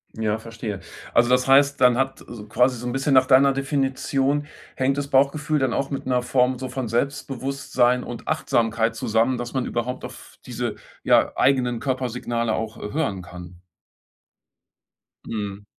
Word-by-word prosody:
Ja, 110 -1 -1
verstehe. 115 -3 -6 0.3
Also, 120 +1 +4
das 125 +1 +3
heißt, 140 +1 +4
dann 125 -1 +5
hat 135 0 -1
e 105 -3 -10
quasi 125 +4 +2
so 125 +1 -6
'n 120 - -3
bisschen 135 +1 0
nach 130 -1 +6
deiner 135 +1 +6
Definition, 135 +1 0 0.3
hängt 135 +1 0
das 140 -1 -3
Bauchgefühl 145 +3 +2
dann 130 -3 0
auch 140 - -1
mit 140 - -5
'ner 125 -1 +1
Form 125 0 +2
so 130 +1 -5
von 125 -2 -4
Selbstbewusstsein 130 0 0
und 120 - -8
Achtsamkeit 115 0 0
zusammen, 115 +2 +1
dass 120 0 -6
man 130 -2 -1
überhaupt 120 +2 -3
auf - - -12
diese, - - -3 0.3
ja, - - +3
eigenen 125 -3 +2
Körpersignale 125 -3 -2
auch, 110 0 -4
äh, 105 - -6
hören 140 -12 -1
kann. 90 0 -11 1.6
Mhm. 100 -2 -5
125 Hz, 160 wpm, -23 LUFS, 115-135 Hz, 1.6 s, nach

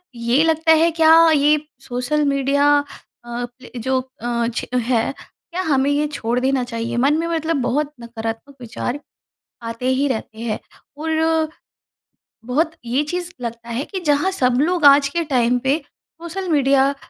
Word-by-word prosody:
ये 235 +5 +2
लगता 320 0 +2
है 325 +1 +4
क्या 320 0 +5 0.2
ये 300 0 +4 0.3
सोशल 250 +5 0
मीडिया 280 +1 +2 0.6
अ, 240 0 -4 0.3
जो 260 +3 0
अ, 240 -3 -3
छ - - -2 0.2
है, 235 +1 0 0.4
क्या 360 +2 -2
हमें 280 -4 +2
ये 290 +1 +1
छोड़ 245 -4 -2
देना 260 0 +1
चाहिए, 230 -1 -4
मन 280 +5 +3
में 330 - -1
मतलब 330 -1 -1
बहुत 290 +4 0
नकारात्मक 230 +3 -6
विचार 245 +3 -4 0.6
आते 230 +2 -4
ही 265 +2 +1
रहते 220 -3 -4
हैं। 230 -2 -2 0.4
और 320 0 +1 1.0
बहुत 300 +7 0
ये 250 +5 +1
चीज़ 355 +3 -4
लगता 235 0 -6
है 240 +5 -2
कि 380 +2 -5
जहाँ 295 +6 +2
सब 250 -9 +1
लोग 340 +1 +1
आज 280 0 +7
के 340 +4 -1
टाइम 250 -4 +2
पे, 270 +4 +1 0.5
सोशल 360 +2 -5
मीडिया 275 -2 +4
अ, - - -5
275 Hz, 160 wpm, -20 LUFS, 240-315 Hz, 1.0 s, आज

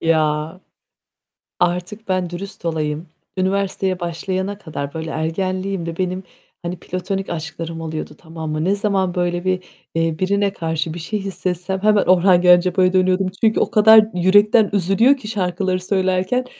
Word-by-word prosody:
Ya! 155 +1 0 1.0
Artık 180 +5 -1
ben 185 -2 0
dürüst 180 +1 -8
olayım. 155 0 -2 0.3
Üniversiteye 190 0 0
başlayana 185 +3 -3
kadar, 145 -7 -6
böyle, 160 0 -5
ergenliğimde 185 +1 -2
benim 185 0 -2 0.4
hani 175 +1 -4
platonik 190 +2 -4
aşklarım 165 0 -5
oluyordu, 155 -1 -5
tamam 160 -2 -7
mı? 155 +1 -1
Ne 195 +2 +2
zaman 195 -3 0
böyle 175 0 -1
bir, 185 -1 0 0.3
eee, 165 -1 0
birine 200 +1 +1
karşı 160 -1 -2
bir 170 - -6
şey 210 +6 -3
hissetsem 185 -1 -3
hemen 210 -1 +4
Orhan 180 0 +5
Gencebay'a 180 +1 +4
dönüyordum. 185 0 +2
Çünkü 220 -1 +3
o - - +1
kadar 220 0 +7
yürekten 205 +4 +4
üzülüyor 205 +8 +3
ki 215 - -10
şarkıları 185 -2 -1
söylerken 190 +6 0
185 Hz, 140 wpm, -20 LUFS, 170-195 Hz, 1.0 s, kadar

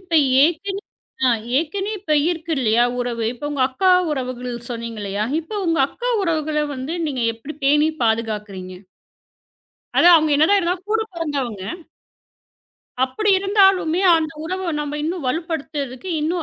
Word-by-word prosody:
இப்ப 365 -3 -17 0.3
ஏற்கனவே 385 +6 0 0.5
ஆ - - +5 0.3
ஏற்கனவே 385 +1 -1 0.2
இருக்கு 330 -1 -5
இல்லயா 235 -1 +3
உறவு. 240 -2 -2
இப்ப 250 +4 -6
உங்க 275 -3 0
அக்கா 370 +9 +2 0.2
உறவுகள் 250 -3 -4
சொன்னீங்க 230 -2 -5
இல்லயா! 200 +1 -2 0.2
இப்போ 325 +6 -9
உங்க 330 -1 +1
அக்கா - - -4
உறவுகள 310 -3 0 0.2
வந்து 260 +4 -5
நீங்க 265 -4 -2
எப்பிடி 230 +7 -9
பேணி 295 +2 +4 0.2
பாதுகாக்குறீங்க? 210 -5 -2 1.2
அது 345 - +6
அவங்க 310 -2 +4
என்னதான் 360 +3 +2
கூடப் 445 +1 0
பொறந்தவங்க. 275 - -3 1.4
அப்படி 405 +12 +1
இருந்தாலுமே 385 -4 +3 0.2
அந்த 320 0 -2
உறவை 370 +3 -3
நாம 295 0 -4
இன்னும் 325 -1 -3
வலுப்படுத்துறதுக்கு 300 -1 -4
இன்னும் 335 +3 -1
305 Hz, 130 wpm, -21 LUFS, 245-350 Hz, 1.4 s, அது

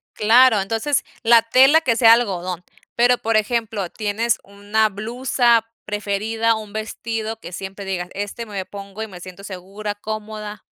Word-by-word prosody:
Claro, 225 +1 +5
entonces 225 +8 0 0.2
la 230 0 +6
tela 265 +7 +5
que 255 -7 +1
sea 230 -1 +7
algodón. 185 -6 -1 0.3
Pero, 245 +1 +4
por 225 -1 +1
ejemplo, 215 -3 -1
tienes 215 +3 -1
una 205 +2 0
blusa 235 +2 +1 0.2
preferida, 215 +2 0
un 215 -2 -8
vestido 220 0 -4
que 180 - -10
siempre 195 +2 -7
digas, 180 -2 -3
este 205 +3 -5
me 200 -3 -5
pongo, 200 +1 -9
y 220 - -3
me 185 -4 -11
siento 185 +2 -11
segura, 200 +2 -6
cómoda. 215 -1 -6
215 Hz, 150 wpm, -21 LUFS, 200-230 Hz, 0.3 s, sea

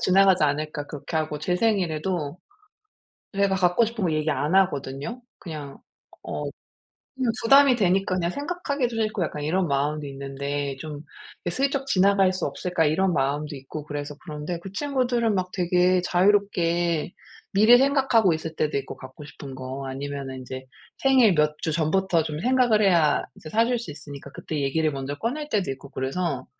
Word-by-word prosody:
지나가지 190 -3 +5
않을까 150 0 -2
그렇게 150 +3 -5
하고 155 -1 -1
제 180 +4 0
생일에도 175 -6 0 1.0
제가 200 -1 +2
갖고 180 +5 +3
싶은 225 -3 -3
거 165 - +1
얘기 155 0 0
안 150 +4 0
하거든요. 150 - 0 0.2
그냥 150 -5 -8 0.4
어 - - -4 0.7
그냥 250 -3 +1
부담이 275 +2 +7
되니까 195 -2 +2
그냥 170 -1 0
생각하기도 285 - -2
싫고 215 -4 0
약간 150 -1 -4
이런 175 +4 +1
마음이 145 +1 -1
있는데 140 0 -4
좀 150 +1 -7 0.4
'이게 175 - -1
슬쩍 275 0 0
지나갈 195 -4 +4
수 185 - -2
없을까?' 180 -3 -1
이런 175 +5 +2
마음도 145 +1 -1
있고 145 +3 -8
그래서 145 0 -5
그런데 155 +1 -5
그 195 - -8
친구들은 245 -3 0
막 180 -1 -1
되게 180 0 +2
자유롭게 175 -4 +2 0.4
미리 215 +5 +7
생각하고 265 - +3
있을 160 0 -5
때도 150 -2 0
있고 140 - -7
갖고 130 +3 -11
싶은 140 -2 -10
거. 130 +1 -6
아니면은 135 0 -5
인제 130 +1 -8 0.3
생일 255 -8 +5
몇 150 0 +2
주 160 - -2
전부터 170 +2 +1
좀 150 -1 -4
생각을 245 -2 +3
해야 170 -6 +4
이제 155 - -11
사줄 230 +4 +2
수 230 -9 -7
있으니까 145 -2 -9
그때 150 0 -4
얘기를 155 +3 +1
먼저 140 +1 -4
꺼낼 295 +6 -3
때도 200 - 0
있고 135 +1 -11
그래서 135 +1 -2
170 Hz, 360 characters per minute, -25 LUFS, 145-200 Hz, 1.0 s, 부담이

